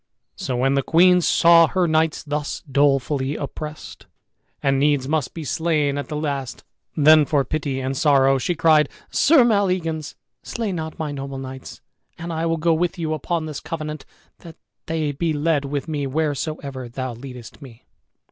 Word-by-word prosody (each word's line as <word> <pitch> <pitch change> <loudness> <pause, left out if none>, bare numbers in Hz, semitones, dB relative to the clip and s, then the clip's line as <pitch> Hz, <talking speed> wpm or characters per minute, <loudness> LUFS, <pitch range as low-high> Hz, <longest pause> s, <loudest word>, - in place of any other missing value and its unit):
So 125 -2 -3
when 135 +2 +2
the 140 - +2
queen 180 +5 +4
saw 170 0 +5
her 185 0 0
knights 160 0 +1
thus 150 -1 -4
dolefully 140 -1 +1
oppressed, 150 +1 -7 0.6
and 135 -1 +2
needs 145 -2 +2
must 155 0 -1
be 165 - -5
slain 150 -2 0
at 145 - -5
the 150 - -5
last, 140 -5 -4 0.3
then 155 +1 +7
for 140 -1 +1
pity 145 -4 -3
and 135 +1 -3
sorrow 135 -3 +3
she 175 +8 -1
cried, 155 -2 +4 0.2
"Sir 285 -3 +5
Maleagans, 185 -8 0 0.3
slay 225 -4 -4
not 160 -3 -5
my 155 -3 -3
noble 135 -1 -6
knights 130 0 -9 0.4
and 170 0 -6
I 165 +1 -1
will 165 0 0
go 165 +1 +2
with 175 +3 -1
you, 160 -2 -2
upon 160 +2 -2
this 155 -2 -6
covenant, 155 -3 -6 0.3
that 165 -2 -12 0.3
they 155 -2 -1
be 160 +3 -1
led 150 -1 0
with 140 +2 -4
me 145 -3 -2
wheresoever 140 -3 -3
thou 130 +1 -5
leadest 125 +1 -11
me." 125 -4 -14
150 Hz, 165 wpm, -22 LUFS, 135-165 Hz, 0.6 s, then